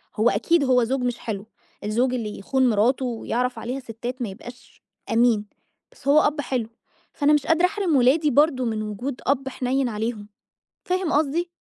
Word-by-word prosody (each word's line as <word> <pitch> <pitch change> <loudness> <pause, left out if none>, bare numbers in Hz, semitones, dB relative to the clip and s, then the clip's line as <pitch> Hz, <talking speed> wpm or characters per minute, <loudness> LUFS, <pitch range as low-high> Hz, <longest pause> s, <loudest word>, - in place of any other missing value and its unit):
هو 220 +3 +3
أكيد 335 +2 +2
هو 255 -2 +3
زوج 260 +3 -1
مش 245 -1 -1
حلو، 205 -3 -5 0.4
الزوج 240 +5 +1
اللي 220 -4 -4
يخون 260 +5 +1
مراته 240 +5 +2
ويعرف 245 +1 -2
عليها 250 +3 -4
ستات 245 +1 -7
ما 235 - -2
يبقاش 245 +6 -13 0.3
أمين، 225 -2 +3 0.5
بس - - -15
هو 290 +2 +6
أب 295 0 +1
حلو، 250 -5 -2 0.4
فأنا 290 0 +3
مش 295 -2 +1
قادرة 325 +2 +4
أحرم 380 -4 0
ولادي 280 +4 +4
برضو 275 -1 +3
من 220 -2 -2
وجود 240 +5 -5
أب 270 0 +1
حنين 260 0 -1
عليهم. 215 -1 -4 0.6
فاهم 365 -2 0
قصدي؟ 315 +4 +1
255 Hz, 170 wpm, -23 LUFS, 230-285 Hz, 0.6 s, هو